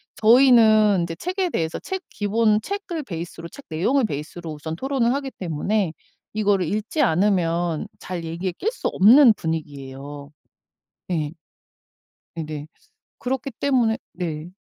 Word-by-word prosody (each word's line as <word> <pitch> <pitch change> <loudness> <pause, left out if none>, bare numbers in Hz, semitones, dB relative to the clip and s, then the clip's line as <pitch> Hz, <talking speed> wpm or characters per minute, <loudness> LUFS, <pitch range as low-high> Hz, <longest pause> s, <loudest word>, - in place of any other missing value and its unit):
저희는 220 -5 +6
이제 170 -1 -4
책에 365 - -2
대해서 160 - -2
책 380 -1 -5
기본 215 +1 +2
책을 385 - -4
베이스로 170 -5 -7
책 280 - -13
내용을 230 - +1
베이스로 160 +1 -5
우선 160 +2 -6
토론을 255 +2 0
하기 275 -1 -3
때문에 180 +2 -1 0.4
이거를 205 -3 +2
읽지 215 - -1
않으면 170 -2 +1
잘 175 -2 -5
얘기에 170 +3 -3
낄 445 - 0
수 - - -3
없는 235 +5 +7
분위기예요. 145 -3 -6 0.8
예. 155 -4 -1 1.0
네네. 155 -2 -5 0.5
그렇기 265 +1 -3
때문에 245 -5 +2 0.2
네. 165 -2 -4
190 Hz, 280 characters per minute, -23 LUFS, 160-245 Hz, 1.0 s, 없는